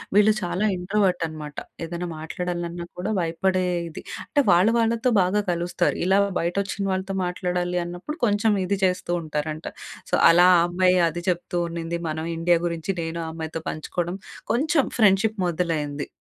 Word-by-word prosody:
వీళ్ళు 210 +1 +6
చాలా 180 +3 -1
ఇంట్రోవర్ట్ 185 -1 +1
అనమాట. 150 -2 -8 0.3
ఏదైనా 175 +1 -4
మాట్లాడాలన్నా 175 +1 -4
కూడా 205 +4 -2
భయపడేది. 175 0 -1 0.2
అంటే, 290 - +2
వాళ్ళ 175 +4 +5
వాళ్ళతో 230 +2 +2
బాగా 185 +3 +2
కలుస్తారు. 175 0 0
ఇలా 190 +2 +4 0.2
"బయటొచ్చిన 195 +3 -1
వాళ్ళతో 190 +1 -2
మాట్లాడాలి 180 0 -1
అన్నప్పుడు 180 - -6
కొంచెం 210 0 +2
ఇది 200 +2 0
చేస్తూ" 180 -1 -1
ఉంటారంట. 155 +1 -4 0.4
సో, - - +4 0.2
అలా 175 +2 +6
ఆ - - +5
అమ్మాయి 185 +1 +3
అది 170 +2 -6
చెప్తూ 175 0 -2
ఉండింది. 170 0 -4
మనం 160 +1 -3
ఇండియా 170 0 +3
గురించి 170 +3 -2
నేను 165 +1 -4
ఆ - - -4
అమ్మాయితో 160 0 -5
పంచుకోవడం, 175 +3 -3 0.4
కొంచెం 295 +3 +2
ఫ్రెండ్షిప్ 210 +1 +4
మొదలైంది. 155 -4 -2
175 Hz, 145 wpm, -24 LUFS, 170-195 Hz, 0.4 s, వీళ్ళు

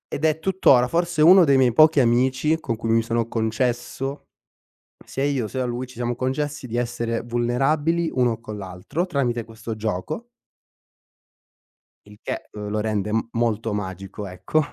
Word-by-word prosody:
ed 150 - -1
è 155 0 +2
tuttora, 160 -9 +4
forse 170 -1 +1
uno 180 +3 +8
dei 140 -3 +4
miei 125 -3 +4
pochi 155 +2 +6
amici, 130 +6 +2
con 120 -7 -3
cui 115 0 -4
mi 115 0 +4
sono 115 0 -1
concesso 120 +4 -2 0.8
sia 135 - -3
io 140 -5 0
sia 130 +4 -3
a - - 0
lui, 120 +1 -3
ci 125 - -15
siamo 120 0 -2
concessi 135 +3 -2
di 120 -1 -6
essere 120 -1 -2
vulnerabili 135 +8 0
uno 120 -3 +1
con 110 -2 -8
l'altro, 95 - -4
tramite 125 -9 -1
questo 115 0 -7
gioco 110 - -4 1.8
il 105 0 -16
che, - - -5
uhm, 105 -1 -7
lo 105 +1 -1
rende 105 -1 -1
m 115 +1 0
molto 115 -1 0
magico 95 0 -5
ecco. 90 - -1
120 Hz, 165 wpm, -23 LUFS, 110-140 Hz, 1.8 s, uno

